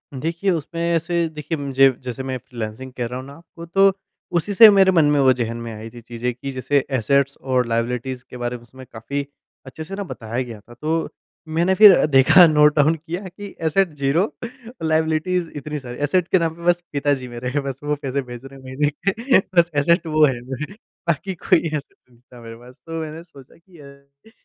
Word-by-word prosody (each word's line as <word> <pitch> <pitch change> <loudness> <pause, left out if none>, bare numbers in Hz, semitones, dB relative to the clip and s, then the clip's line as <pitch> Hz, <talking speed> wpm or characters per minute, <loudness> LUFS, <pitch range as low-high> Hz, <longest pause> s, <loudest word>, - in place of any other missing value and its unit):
देखिए, 170 +8 -1
उसमें 165 0 -3
ऐसे 170 0 0
देखिए 155 +1 -5
मुझे 135 -1 +4
जैसे 130 +1 -5
मैं 130 -1 -3
फ्रीलांसिंग 120 +1 -7
कर 120 -2 -4
रहा 125 +1 -5
हूँ 130 - -9
ना 140 +4 -13 0.2
वो 170 - -8
तो 195 +3 +4 0.5
उसी 205 +5 -2
से 220 +2 +10
मेरे 195 -2 +5
मन 165 -5 +4
में, 145 0 +3
वो 130 -1 +5
ज़हन 115 -2 -3
में 115 0 -6
आई 110 +1 -8
थी 120 +1 -12
चीज़ें 120 +1 -4
कि 135 +3 -7
जैसे 135 +1 0
एसेट्स 140 +3 +1
और 130 -2 +1
लायबिलिटीज़ 125 +2 -2
के 125 - -9
बारे 120 0 -3
में 120 - -18
उसमें 130 +2 -14
काफ़ी 140 +6 -4 0.4
अच्छे 135 +4 -8
से 195 +5 -7
न 200 - -4
बताया 115 -2 -4
गया 115 -3 -9
था। 120 +4 -17
तो 160 +5 -2 0.4
मैंने 170 +4 +1
फिर 210 +1 +10
अ, - - +3
देखा 145 +5 +7
नोट 150 -1 +4
डाउन 155 +2 +4
किया 165 +3 -6
कि 200 +2 -10
एसेट 165 +1 +1
ज़ीरो 140 +5 +1
और 235 -2 -8
लायबिलिटीज़ 160 +2 0
इतनी 150 +1 -5
सारी, 125 -2 -9
एसेट 165 +5 +1
के 185 - +3
नाम 165 -1 -1
पे 170 - -13
बस 175 0 +2
पिताजी 140 -2 0
मेरे 120 +1 -5
हैं 145 +2 -2
बस 135 -1 -5
वो 150 0 0
पैसे 140 -1 -2
भेज 120 0 -10
रहे 135 0 -12
हैं - - -17
महीने 135 +3 0 0.2
के। 230 +5 +2 0.2
बस 170 0 +5
एसेट 170 +4 +2
वो 155 -1 +4
है 130 -4 -1
मेरे 130 +8 -6 0.3
बाकी 170 +4 -1
कोई 165 - +3
एसेट 150 -2 -5 0.2
नहीं 120 -1 -24
था 125 0 -16
मेरे 115 0 -10
पास। 125 +2 -17
तो 165 0 -4
मैंने 160 +1 -7
सोचा 140 -6 -17
कि 170 0 -20
ये 140 +5 -18
145 Hz, 220 wpm, -21 LUFS, 130-165 Hz, 0.5 s, से